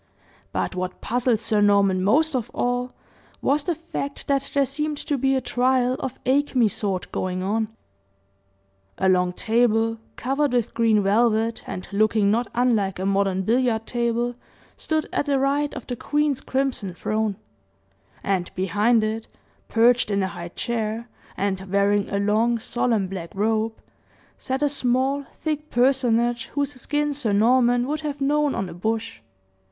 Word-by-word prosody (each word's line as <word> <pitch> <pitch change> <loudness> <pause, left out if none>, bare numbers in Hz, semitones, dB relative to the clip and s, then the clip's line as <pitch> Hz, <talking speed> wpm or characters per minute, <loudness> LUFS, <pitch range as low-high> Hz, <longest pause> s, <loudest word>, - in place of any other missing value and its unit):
But - - -2
what 185 0 -4
puzzled 245 -1 +1
Sir 215 -1 +1
Norman 200 -2 +3
most 300 +9 +3
of 245 -4 -2
all 245 +1 -1 0.5
was, 285 +2 +1
the 345 - 0
fact 300 -3 -5
that 275 0 0
there 280 -1 +4
seemed 300 +2 -2
to 290 0 -2
be 270 0 +1
a 260 - +1
trial 250 +1 +1
of 265 0 -4
acme 265 -3 +3
sort 195 -2 -3
going 185 0 -2
on. 215 +3 0 1.3
A 190 - +1
long 180 -1 +3
table, 225 +2 +1 0.2
covered 275 +2 0
with 240 -2 0
green 225 -3 +3
velvet, 225 +2 +2
and 185 -1 -6
looking 210 0 +3
not 235 +2 +1
unlike 225 -6 +1
a 190 - -3
modern 195 -1 +1
billiard 230 +1 +1
table, 240 0 -1 0.4
stood 315 -1 -1
at 290 - 0
the 280 -1 +2
right 280 +2 +1
of 255 - -7
the 245 - -4
queen's 295 +1 0
crimson 260 -9 -2
throne; 215 +1 -1 0.9
and 190 -3 0
behind 205 +5 +2
it, 220 +1 -2 0.4
perched 235 0 +3
in 200 -1 +1
a 190 - -1
high 170 -1 -7
chair, 225 +3 -3 0.3
and 195 -1 -1
wearing 200 0 +2
a 200 - -1
long, 215 +4 +2
solemn, 230 -2 0
black 185 -3 -6
robe, 220 +2 0 0.6
sat 265 +2 -3
a - - +4
small, 270 +1 0
thick 305 -1 -3
personage, 240 -2 +2
whose 285 0 0
skin 295 +1 0
Sir 245 -7 -1
Norman 245 +3 +4
would 300 +3 -2
have 290 -2 -4
known 290 +1 +1
on 195 - -2
a - - -8
bush. 225 +5 -3
235 Hz, 155 wpm, -24 LUFS, 205-270 Hz, 1.3 s, there